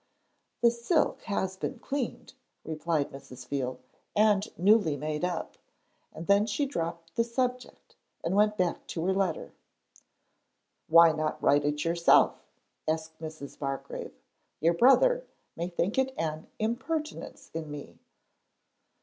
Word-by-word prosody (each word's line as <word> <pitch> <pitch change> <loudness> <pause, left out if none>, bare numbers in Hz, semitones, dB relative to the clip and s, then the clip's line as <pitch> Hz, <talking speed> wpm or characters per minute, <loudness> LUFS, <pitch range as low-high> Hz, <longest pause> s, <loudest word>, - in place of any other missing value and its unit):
'The 235 - +7
silk 240 +8 +1
has 190 -3 -1
been 220 +6 -4
cleaned,' 270 +1 -4 0.3
replied 160 -1 -1
Mrs. 130 -2 -11
Veal, 130 -2 -2 0.4
'and 210 -1 +4
newly 185 -5 +4
made 150 +2 -3
up,' 180 -2 -3 0.5
and 165 - -8
then 200 +2 +4
she 230 +7 0
dropped 170 -9 -4
the 230 - +3
subject 250 +1 -3 0.3
and 170 +3 0
went 210 +1 +3
back 180 -2 -1
to 165 0 -3
her 190 - +2
letter. 190 -4 -1 1.3
'Why 165 0 +8
not 155 0 -2
write 145 0 +3
it 150 +1 -1
yourself?' 170 0 +4 0.4
asked 160 0 -2
Mrs. 155 -3 -8
Bargrave. 135 -1 -5 0.4
'Your 165 +3 +3
brother - - +5 0.3
may 170 +1 -2
think 180 +6 0
it 265 0 0
an 155 -1 -3
impertinence 265 +8 -3
in 160 -2 -5
me.' 140 - -9
170 Hz, 130 wpm, -29 LUFS, 155-220 Hz, 1.3 s, Why